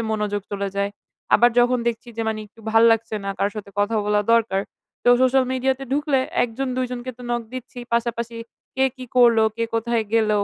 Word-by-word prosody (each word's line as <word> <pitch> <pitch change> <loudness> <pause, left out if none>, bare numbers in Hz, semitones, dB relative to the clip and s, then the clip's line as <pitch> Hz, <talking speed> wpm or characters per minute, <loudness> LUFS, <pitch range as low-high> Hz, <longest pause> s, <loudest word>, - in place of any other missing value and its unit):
মনোযোগ 210 -2 -1
চলে 200 0 -2
যায়। 200 0 0 0.4
আবার 240 +1 +6
যখন 245 +1 +4
দেখছি 235 +1 -5
যে, 230 - -1
মানে 220 -1 -2
একটু 225 - -20
ভাল 225 +1 +5
লাগছে 225 -1 -1
না, 195 - -2
কার 200 - +1
সাথে 210 -2 -7
কথা 205 +2 +1
বলা 210 0 +3
দরকার, 225 -4 +2 0.4
তো - - +4
social 260 0 +4
media 260 +1 +1
তে 270 - -6
ঢুকলে 290 -1 +1 0.2
১ 245 - +1
জন-২ 255 -1 -1
জনকে 250 0 -5
তো - - -10
knock 240 -1 -1
দিচ্ছি, 255 0 -8 0.2
পাশাপাশি 235 0 -2 0.4
কে 265 - +3
কী 255 - -8
করল, 240 -2 +6 0.2
কে 230 - 0
কোথায় 230 0 0
গেল? 220 -2 +3
235 Hz, 200 wpm, -22 LUFS, 215-250 Hz, 0.4 s, আবার